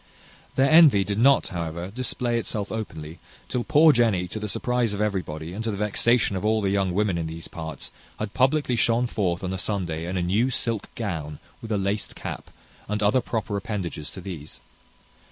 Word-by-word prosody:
Their 135 +2 +3
envy 155 -11 +7
did 100 +2 -2
not, 135 +3 +5
however, 85 +1 -4
display 120 0 -1
itself 105 -3 -3
openly, 80 -7 -6 0.3
till 125 - -1
poor 155 +4 +6
Jenny, 110 -7 +2
to 110 - -5
the 105 0 -4
surprize 120 -1 0
of - - -6
everybody, 90 -6 -2
and 110 +4 -4
to 115 - -1
the 100 - -3
vexation 105 +1 +2
of 95 - -3
all 110 +1 +2
the 100 -2 0
young 100 -2 +1
women 100 -4 +1
in 80 - -2
these 80 +1 -7
parts, 80 -4 -7 0.3
had 105 -1 -4
publickly 130 0 +2
shone 120 +1 +2
forth 95 -7 -1
on 95 0 -2
a 95 - -3
Sunday 85 -5 -2
in 95 +1 -2
a 90 - 0
new 105 +9 +2
silk 115 -4 -1
gown, 80 -9 -4 0.2
with 115 - -7
a 105 - +2
laced 100 +1 -2
cap, - - -6 0.4
and 105 0 -1
other 125 +6 +4
proper 110 -3 -3
appendages 95 -7 -4
to 95 - -9
these. 85 -5 -8
100 Hz, 195 wpm, -25 LUFS, 90-115 Hz, 0.4 s, envy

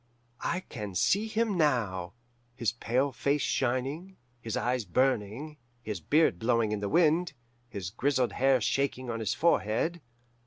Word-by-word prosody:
I 180 +2 -1
can 105 - -7
see 205 - +2
him 220 -3 0
now, 105 - +1 0.4
his 115 -4 0
pale 125 +4 0
face 140 +2 0
shining, 135 +9 -1 0.2
his 115 -1 -3
eyes 125 +2 0
burning, 130 - 0 0.3
his 105 -4 -4
beard 145 - +2
blowing 115 -1 +1
in 105 - -1
the 100 -1 -3
wind, 165 0 +3 0.4
his 95 -6 -5
grizzled 130 +2 +1
hair 135 0 +3
shaking 130 +2 -1
on 115 - -3
his 110 0 -1
forehead. 165 +2 +1
130 Hz, 145 wpm, -29 LUFS, 110-150 Hz, 0.4 s, wind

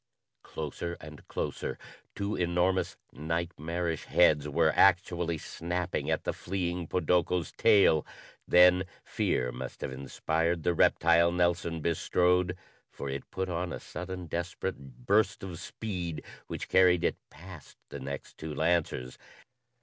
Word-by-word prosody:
Closer 80 +3 -5
and 75 0 -12
closer! - - -3 0.4
Two 100 +1 -2
enormous 90 +2 +1 0.2
nightmarish 80 +2 -3
heads 75 -4 +4
were 80 +1 +3
actually 85 -3 +3
snapping 85 +3 -3
at - - 0
the - - -1
fleeing 90 -2 -3
podoko's 90 0 +1
tail. 100 -8 +5 0.4
Then 90 +1 +6 0.2
fear 60 -1 0
must - - -7
have - - -3
inspired 80 +5 -1
the 90 - +2
reptile 85 +1 +4
Nelson 85 -2 0
bestrode, 90 +2 +1 0.3
for 70 - -6
it 70 0 -5
put 95 0 -3
on 90 0 -2
a - - -5
sudden 90 0 -6
desperate 80 -7 -5
burst 105 0 +2
of 90 -4 -6
speed 90 -4 -5 0.2
which - - -5
carried 90 -2 +5
it - - +1
past 90 -1 -13
the 70 - -7
next 70 +1 -7
two 80 -1 -5
lancers. 80 -6 0
85 Hz, 125 wpm, -30 LUFS, 80-90 Hz, 0.4 s, Then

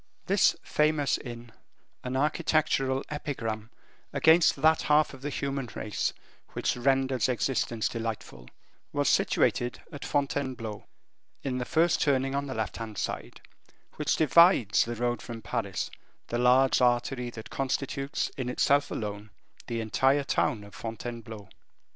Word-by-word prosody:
This 195 +1 +4
famous 150 -2 +1
inn, 120 -2 -9 0.5
an 130 +1 -2
architectural 140 -2 +1
epigram 115 -7 -4 0.4
against 160 +1 +5
that 160 0 +4
half 150 0 +3
of 135 - -11
the 145 - -3
human 135 -3 -3
race 105 - -2 0.4
which - - 0
renders 130 -1 +1
existence 120 -2 0
delightful, 110 - -5 0.5
was - - +1
situated 120 0 +1
at 145 -3 -8
Fontainebleau, 130 -7 -2 0.6
in 130 -2 -2
the 125 - -2
first 165 +4 +2
turning 135 -2 +2
on 140 0 -1
the 130 - -5
left 110 -1 -3
hand 110 -2 -7
side, - - -4 0.6
which - - +1
divides 165 - +5
the 120 +1 -4
road 120 +1 -1
from 115 -1 -8
Paris, 105 -6 -3 0.4
the 120 - -1
large 130 +2 +4
artery 125 0 +1
that 110 -2 -10
constitutes 135 +1 -2
in 130 -2 -2
itself 140 +3 +2
alone 105 0 -5 0.4
the 115 -1 -2
entire 135 +6 +2
town 110 -5 0
of 100 -1 -13
Fontainebleau. 115 -2 -7
125 Hz, 135 wpm, -28 LUFS, 115-140 Hz, 0.6 s, against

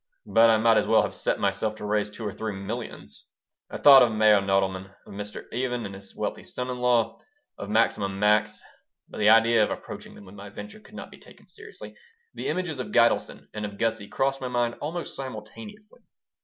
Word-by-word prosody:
But 115 0 +5
I 110 - +5
might 115 0 +4
as 105 - +1
well - - +4
have - - -4
set - - -2
myself 100 +2 -1
to 105 - -8
raise 105 0 0
two 110 +2 -9
or 105 - -2
three 110 -1 -5
millions 110 +5 -7 0.4
I - - -6
thought 140 -2 +8
of 120 -2 +4
Meyer 110 -2 +4
Nodelman, 95 -1 -1
of - - -12
Mr. 105 +1 -7
Even 125 0 -2
and 100 - -7
his 95 0 -10
wealthy - - -4
son 125 0 -4
in 125 - -5
law, 120 -2 +1 0.4
of 100 - -6
Maximum 100 -3 +1
Max. 105 +1 +1 0.4
But - - -10
the 105 0 +4
idea 115 0 +5
of - - 0
approaching - - -8
them 100 - -14
with 95 - -14
my 100 0 -10
venture 215 - -10
could - - -17
not - - -9
be - - -14
taken - - -18
seriously. 440 0 -12 0.4
The - - -5
images 160 -3 -2
of 125 - -5
Gitelson 115 0 +2
and 105 - -5
of 100 -1 -6
Gussie 115 -2 -1
crossed 135 +3 -1
my 130 - -3
mind 120 -1 0
almost 165 +3 -5
simultaneously. 140 - -9
110 Hz, 210 wpm, -26 LUFS, 105-125 Hz, 0.4 s, thought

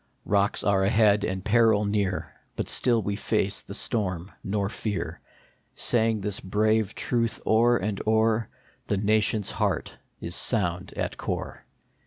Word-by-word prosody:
Rocks 100 0 +1
are 100 -1 +2
ahead 105 0 +4
and 95 0 -3
peril 110 -1 +4
near; 95 -8 -1 0.2
But - - -3
still 120 -3 +2
we 100 - -2
face - - -1
the - - -8
storm, 95 -4 -1
nor 100 0 -1
fear, 105 -1 -4 0.6
Saying 115 -3 +1
this 100 0 0
brave 110 +2 +1
truth 115 -2 0
o 110 +1 +4
er 120 0 +4
and 100 0 -3
o 110 0 +4
er: 110 0 +1 0.2
" - - -34
The 100 - 0
nation 105 +1 +2
s - - -2
heart - - -1 0.2
is 85 - -4
sound 90 -5 0
at - - -3
core." - - -5
105 Hz, 160 wpm, -26 LUFS, 95-110 Hz, 0.6 s, ahead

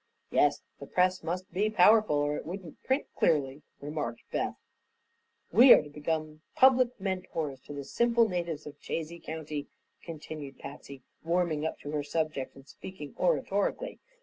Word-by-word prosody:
"Yes, - - +3 0.2
the - - -9
press 185 0 +2
must 180 +2 -4
be 205 +4 +1
powerful 215 -3 +5
or 145 0 +1
it - - -5
wouldn't 175 -2 -8
print 265 +3 0
clearly," 145 -3 +1 0.2
remarked 145 -5 -4
Beth. - - -1 1.0
"We 245 +4 +9
are - - +5
to 150 - -12
become 155 +1 -3
public 255 -2 +5
mentors 180 -7 -3
to - - -7
the 140 -1 -5
simple 235 - +2
natives 170 -5 -3
of 145 -1 -11
Chazy 165 +1 -4
County," 155 -3 -5 0.3
continued 150 -4 -8
Patsy, 140 -2 -10 0.2
warming 165 -2 +1
up - - -5
to 145 - -6
her 150 -1 -1
subject 155 -2 -2
and 135 0 -15
speaking 145 +2 -9
oratorically. 200 - 0
160 Hz, 150 wpm, -30 LUFS, 145-185 Hz, 1.0 s, We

